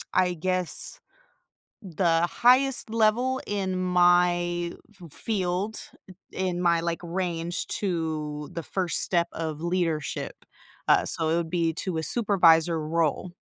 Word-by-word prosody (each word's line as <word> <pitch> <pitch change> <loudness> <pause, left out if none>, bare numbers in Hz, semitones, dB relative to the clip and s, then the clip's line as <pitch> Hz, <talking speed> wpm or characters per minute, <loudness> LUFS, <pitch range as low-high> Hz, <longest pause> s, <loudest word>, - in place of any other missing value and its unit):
I 180 -1 +3
guess, 185 +1 -1 0.8
the 170 -2 +1
highest 255 +1 +3
level 230 +4 +1
in 195 -2 -2
my 175 -1 +2 0.3
f 165 -4 -12
field, 200 0 -2 0.5
in 185 -2 -2
my, 170 -1 +3
like, 170 0 -3
range 175 -1 -3
to 155 -5 -3
the 170 - -5
1st 180 0 0
step 170 -2 +1
of 155 -2 -5
leadership, 170 -3 -2 0.4
uh, - - +4
so 160 -1 -1
it 165 - +2
would 170 -1 -2
be 165 -2 0
to 175 0 -3
a - - -2
supervisor 170 -7 +3
role. 165 +2 -1
175 Hz, 125 wpm, -26 LUFS, 165-185 Hz, 0.8 s, uh